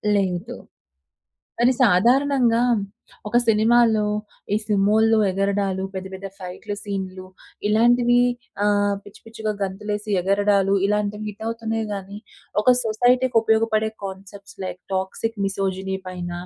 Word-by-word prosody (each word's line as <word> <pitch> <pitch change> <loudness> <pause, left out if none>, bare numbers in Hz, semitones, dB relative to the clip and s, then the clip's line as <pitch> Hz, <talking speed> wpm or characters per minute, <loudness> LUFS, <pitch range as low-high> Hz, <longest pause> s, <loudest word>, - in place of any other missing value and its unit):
లేదు. 195 +4 -1 1.0
కానీ 240 +2 +5
సాధారణంగా 240 +3 +3 0.6
ఒక 230 +3 +2
సినిమాలో 225 0 +4 0.5
ఈ - - +3
సుమోలు 215 +2 +3
ఎగరడాలు, 195 0 -1
పెద్ద, 190 0 -5
పెద్ద 190 +1 -6
ఫైట్లు, 185 +2 -6
సీన్లు 190 -2 -5 0.4
ఇలాంటివి 240 +3 +4 0.4
ఆహ్, 205 -1 +2
పిచ్చి 205 - -15
పిచ్చిగా 220 -1 -4
గంతులేసి 210 +2 -4
ఎగరడాలు 200 +1 +2
ఇలాంటివి 210 +1 -1
హిట్ 210 +1 -10
అవుతున్నాయి 225 -1 -2
గాని, 200 0 -7 0.4
ఒక 250 +4 +5
సొసైటీ‌కి 245 +3 +2
ఉపయోగపడే 220 -1 +2
కాన్సెప్ట్స్ 195 +1 -9
లైక్ 185 - -6
టాక్సిక్ 190 +4 -2
మిసోజినీ 190 -1 -2
పైన, 180 -1 -5
210 Hz, 110 wpm, -22 LUFS, 195-225 Hz, 1.0 s, కానీ